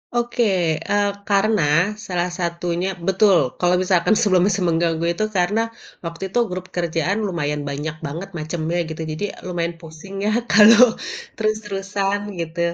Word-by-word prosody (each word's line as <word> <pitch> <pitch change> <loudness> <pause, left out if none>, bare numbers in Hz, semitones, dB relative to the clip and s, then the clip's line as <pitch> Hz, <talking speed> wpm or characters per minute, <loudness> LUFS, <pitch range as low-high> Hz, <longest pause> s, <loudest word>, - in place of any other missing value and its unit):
Oke, 240 0 0 0.5
eee, 205 0 +2 0.2
karena 205 0 +3 0.5
salah 180 -1 -1
satunya 170 +1 -2 0.2
betul, 190 0 +4 0.2
kalo 180 0 +3
misalkan 185 +1 +2
sebelum 185 -5 +3
se - - -3
mengganggu 165 0 +1
itu 215 - -1
karena 200 +5 +2 0.4
waktu 165 +2 -6
itu 215 +6 0
grup 185 0 -5
kerjaan 170 +3 0
lumayan 150 -5 -2
banyak 150 +2 -4
banget 165 +7 -5
macemnya 160 +2 -3
gitu, 160 +1 -6
jadi 155 +6 -5 0.2
lumayan 170 -1 -3
pusing 165 +4 -11
ya - - +2 0.2
kalau 225 +3 +7 0.4
terus-terusan 205 -2 -1 0.2
gitu. 165 +1 -5
180 Hz, 135 wpm, -21 LUFS, 165-205 Hz, 0.5 s, kalau